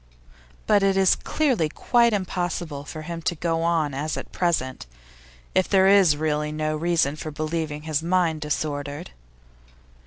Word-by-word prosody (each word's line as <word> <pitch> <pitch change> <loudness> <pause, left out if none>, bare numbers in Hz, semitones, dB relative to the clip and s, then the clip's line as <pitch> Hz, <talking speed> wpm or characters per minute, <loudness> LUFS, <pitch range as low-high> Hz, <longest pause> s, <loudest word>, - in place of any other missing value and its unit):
But 205 -1 +4
it 195 -1 +2
is 190 -1 +5
clearly 255 - 0
quite 235 +8 +2
impossible 175 -6 -3
for 155 +1 -7
him 170 +1 -6
to 175 - -1
go 165 0 -1
on 165 -4 +1
as 145 +3 -3
at - - -7
present 130 - -1 0.7
if 185 - +2
there 190 -1 +4
is 195 -6 +5
really 150 -1 -1
no 155 0 -2
reason 160 -3 +1
for 155 - -6
believing 155 0 -3
his 155 -1 -1
mind 170 -2 +1
disordered. 145 +1 -3
160 Hz, 150 wpm, -24 LUFS, 150-180 Hz, 0.7 s, is